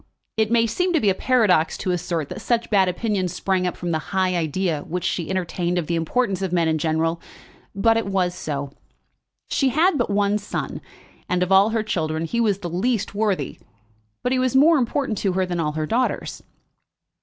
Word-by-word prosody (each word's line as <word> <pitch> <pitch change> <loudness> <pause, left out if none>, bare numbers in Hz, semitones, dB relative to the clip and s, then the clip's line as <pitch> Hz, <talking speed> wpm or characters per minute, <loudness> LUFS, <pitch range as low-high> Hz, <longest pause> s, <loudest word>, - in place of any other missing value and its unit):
It 220 -1 +1
may 230 0 +3
seem 360 - 0
to 325 - +3
be 205 -6 +3
a - - +1
paradox 190 -8 +2
to 185 - -2
assert 170 -4 -2
that - - -7
such 235 -1 0
bad 190 -3 +4
opinion 195 0 -1
sprung 180 +1 -1
from 175 -1 -4
the 160 - 0
high 185 -2 +1
idea 165 -1 -1
which 175 +3 -4
she 175 -2 -2
entertained 180 -1 -1
of 175 - 0
the 170 - -2
importance 195 +4 0
of 190 -2 -2
men 170 -2 +2
in 160 -1 +1
general; 165 +2 0 0.5
but 225 +3 +3
it 225 - -1
was 185 -2 0
so. 140 -4 -4 0.8
She 270 - +2
had 315 +4 +2
but 240 - 0
one 205 +1 +1
son, 205 - -5 0.5
and 180 0 +2
of 180 - -3
all 195 +2 +6
her 225 -1 0
children 160 -5 -2
he 235 +8 -1
was 210 -4 +2
the 190 -3 -6
least 220 +5 -1
worthy; 200 -9 -1 0.6
but 250 - 0
he 260 - +2
was 255 0 0
more 305 +3 +6
important 245 -3 -1
to 195 -3 0
her 185 0 +1
than 175 -1 -3
all 150 -2 -1
her 155 0 -2
daughters. 240 +10 -1
190 Hz, 200 wpm, -22 LUFS, 170-225 Hz, 0.8 s, all